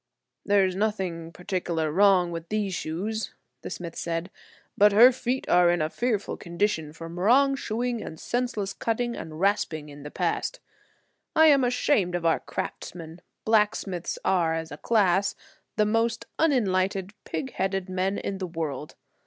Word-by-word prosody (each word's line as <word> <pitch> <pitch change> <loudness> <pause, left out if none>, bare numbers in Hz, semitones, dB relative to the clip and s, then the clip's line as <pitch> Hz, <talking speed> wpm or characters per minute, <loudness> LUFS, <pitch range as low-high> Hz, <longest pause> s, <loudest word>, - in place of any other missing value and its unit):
"There 200 -1 +4
is 185 -1 -2
nothing 185 -5 -2
particular 170 -3 -2
wrong 185 0 +4
with 165 0 -6
these 210 -3 -1
shoes," 195 +7 -3 0.3
the - - -6
smith 170 -2 -6
said, 170 +2 -3 0.4
"but 205 0 +5
her 240 +5 +9
feet 255 +1 -2
are 175 0 +5
in 175 0 +2
a 155 +1 -1
fearful 230 -4 -1
condition 170 -4 -1
from 165 +2 -8
wrong 270 +8 +4
shoeing 240 -2 -2
and 160 - -8
senseless 240 -5 -2
cutting 235 +3 -1
and 155 -1 -7
rasping 170 -6 0
in 145 0 -11
the 150 - -7
past. - - -2 0.8
I 320 - +7
am 280 -3 +5
ashamed 245 -7 +2
of 175 -1 -3
our 165 - +3
craftsmen. 165 0 -6 0.2
Blacksmiths 210 -5 +1
are, 170 -3 +2
as 160 0 -5
a 145 - -7
class, 200 -2 +2 0.4
the 215 - +3
most 230 +1 0
unenlightened, 195 - +1
pig 265 -3 -4
headed 190 0 -1
men 185 +2 -1
in 195 -1 -4
the 185 - -3
world. 155 -4 -5
190 Hz, 155 wpm, -26 LUFS, 170-220 Hz, 0.8 s, her